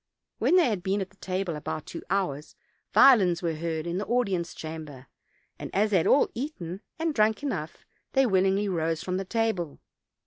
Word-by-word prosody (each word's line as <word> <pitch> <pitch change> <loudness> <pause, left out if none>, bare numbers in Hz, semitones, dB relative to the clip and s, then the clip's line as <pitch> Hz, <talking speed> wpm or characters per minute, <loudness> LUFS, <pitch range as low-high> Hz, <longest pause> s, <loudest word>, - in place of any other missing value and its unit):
When - - +3
they 360 - +6
had 210 -6 -1
been 195 +2 0
at 190 - -8
table 185 -2 -2
about 150 0 -5
two - - -7
hours 175 -7 -2 0.4
violins 190 -10 +6
were 165 -1 0
heard 160 0 -3
in 175 +2 -2
the 205 - -4
audience 195 -8 0
chamber; 155 -5 -8 0.5
and - - -6
as 210 +2 +2
they 195 - +4
had 165 - +1
all 280 - +4
eaten 200 - -5 0.2
and 325 -1 -1
drank 220 +1 +2
enough, 170 - -4 0.3
they 270 0 +4
willingly 195 -1 +2
rose 165 -3 -1
from 185 +1 -2
table. 215 -8 -1
190 Hz, 175 wpm, -27 LUFS, 165-215 Hz, 0.5 s, they